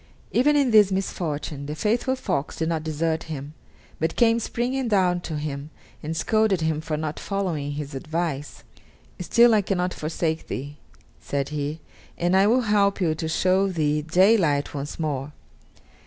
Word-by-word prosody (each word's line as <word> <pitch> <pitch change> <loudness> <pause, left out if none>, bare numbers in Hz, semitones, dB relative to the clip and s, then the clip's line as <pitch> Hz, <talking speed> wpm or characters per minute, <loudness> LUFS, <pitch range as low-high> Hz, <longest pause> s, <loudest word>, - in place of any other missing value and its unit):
Even 295 +5 +3
in 275 -4 +3
this 210 -3 +6
misfortune 155 -6 -3
the 150 - -4
faithful 235 - 0
fox 145 - -2
did 160 0 -1
not 160 -2 -1
desert 160 +1 -1
him, 145 -1 -6 0.5
but 160 +1 -1
came 230 -1 +4
springing 250 +3 -2
down 185 -4 +2
to 160 -3 -4
him 150 -1 -5 0.3
and 160 +2 -4
scolded 215 -4 +2
him 160 -1 0
for 155 -1 -3
not 155 0 -4
following 170 -8 -2
his 145 0 -5
advice. 150 0 -4 0.6
"Still 235 +7 +5
I 215 - +4
cannot 180 -2 -1
forsake 160 +1 -2
thee," 145 +2 -5 0.4
said 140 -1 -3
he, 150 +1 -3 0.4
"and 175 +2 +1
I 195 +1 +5
will 245 +4 +4
help 205 -3 +2
to 160 -3 -1
show 185 +4 +2
thee 150 -5 0
daylight 165 -3 +3
once 145 +2 -5
more." 145 -2 -3
165 Hz, 155 wpm, -24 LUFS, 150-200 Hz, 0.6 s, this